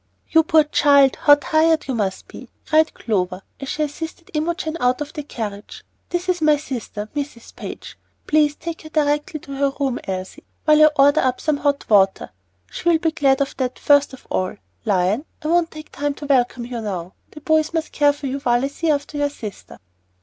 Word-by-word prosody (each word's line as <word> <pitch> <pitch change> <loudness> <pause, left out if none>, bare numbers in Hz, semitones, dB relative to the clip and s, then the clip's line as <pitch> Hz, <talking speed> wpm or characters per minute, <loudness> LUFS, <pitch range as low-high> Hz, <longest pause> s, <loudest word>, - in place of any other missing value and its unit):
"You 320 - +6
poor 315 -1 +4
child, 280 -2 +4
how 290 - +6
tired 315 +2 +2
you 265 - -1
must 200 -5 -2
be!" - - -12 0.2
cried 315 0 +2
Clover, 185 -4 -2 0.2
as 275 - -6
she 305 - -1
assisted 320 +3 -6
Imogen 320 +1 -2
out 250 +2 +2
of 295 0 -5
the 305 - -4
carriage. 215 -7 -7 0.3
"This 350 +1 -2
is 360 -2 0
my 305 -1 +4
sister, 240 -7 -6
Mrs. 285 -5 -6
Page. - - -9 0.3
Please 300 -1 +3
take 335 +1 -6
her 310 - -11
directly 295 0 0
to 275 - -9
her 280 0 +1
room, 270 -3 0
Elsie, 185 -1 -5 0.2
while 305 -1 +5
I 310 - +8
order 280 +1 +5
up 255 -1 0
some 305 -2 0
hot 285 0 -1
water. 195 -3 +3 0.4
She'll 345 -1 +2
be 320 0 0
glad 280 -4 +2
of 275 - -2
that 255 -2 -2
first 285 0 +4
of 265 - -13
all. 185 0 -1 0.3
Lion, 195 +6 +1 0.2
I 305 - -2
won't 340 0 +3
take 310 -1 -11
time 290 0 -2
to 290 - -8
welcome 250 -3 +1
you 240 -1 -5
now. 185 -4 -5 0.2
The 300 - -12
boys 315 +1 +2
must 325 -2 -2
care 290 -1 +4
for 290 0 -8
you 275 +1 -2
while 245 -1 +1
I - - -2
see 325 +3 -2
after 290 0 -1
your 290 0 +1
sister." 215 -8 -9
285 Hz, 200 wpm, -21 LUFS, 250-310 Hz, 0.4 s, I